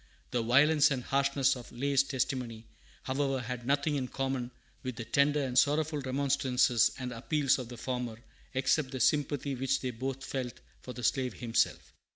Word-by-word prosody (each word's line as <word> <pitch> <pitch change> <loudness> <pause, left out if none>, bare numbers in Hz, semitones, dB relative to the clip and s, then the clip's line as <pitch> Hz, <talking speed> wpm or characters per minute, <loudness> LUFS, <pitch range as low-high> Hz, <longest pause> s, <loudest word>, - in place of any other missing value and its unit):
The 120 -1 +1
violence 145 +6 +5
and 130 -3 -2
harshness 140 0 +2
of 125 -2 -10
Lay's 140 +2 +2
testimony, 125 -4 -3 0.4
however, 135 0 0
had 125 0 -5
nothing 145 +1 +1
in 130 -2 -2
common 135 -2 -2 0.3
with 130 -2 -5
the 115 - -6
tender 140 +5 +2
and 130 -2 -3
sorrowful 150 +3 +3
remonstrances 130 -3 +2
and 125 -1 -4
appeals 135 +3 +1
of 125 -2 -6
the 120 - -8
former, 125 -2 -3 0.4
except 135 +2 +2
the 130 -1 -5
sympathy 145 0 +1
which 135 +1 0
they 130 - -2
both 130 +3 -4
felt 125 -3 -4 0.2
for 125 - -8
the 125 - -8
slave 125 0 +1
himself. 115 -2 -1
130 Hz, 170 wpm, -31 LUFS, 125-140 Hz, 0.4 s, violence